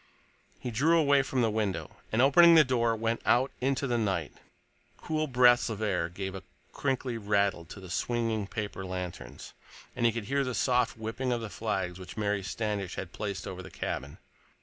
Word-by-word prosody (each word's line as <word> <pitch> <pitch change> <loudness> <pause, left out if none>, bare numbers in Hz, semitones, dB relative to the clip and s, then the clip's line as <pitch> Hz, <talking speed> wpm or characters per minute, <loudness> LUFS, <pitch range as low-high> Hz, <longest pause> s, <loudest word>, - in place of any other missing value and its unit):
He 125 - -5
drew 155 +9 +3
away 140 -3 +4
from 130 -2 -1
the 110 - +2
window 105 -3 -2
and, 115 +3 +3
opening 170 +5 +7
the 160 - +8
door, 120 -3 +1
went 115 +1 -1
out 130 +3 +3
into 135 +1 0
the 120 -3 0
night. 95 -8 -1 0.6
Cool 155 -1 -2
breaths 125 -2 +5
of 110 -2 -4
air 90 -6 0
gave 95 +2 -5
a 95 - -6 0.3
crinkly 130 -3 -2
rattle 100 -4 +1
to 95 +5 -10
the 95 - -10
swinging 115 -1 -1
paper 105 -2 -5
lanterns, 90 -2 -6 0.4
and 120 - -2
he - - +3
could 115 -1 -5
hear 140 +5 +1
the 125 -2 -3
soft 125 -2 +1
whipping 115 +4 -3
of 120 -1 -1
the 110 -2 -6
flags 95 -5 -3
which 95 - -10
Mary 105 -1 0
Standish 100 -1 -3
had 95 -3 -6
placed 100 -3 -4
over - - -6
his - - -12
cabin. 70 +1 -4
110 Hz, 190 wpm, -29 LUFS, 100-125 Hz, 0.6 s, the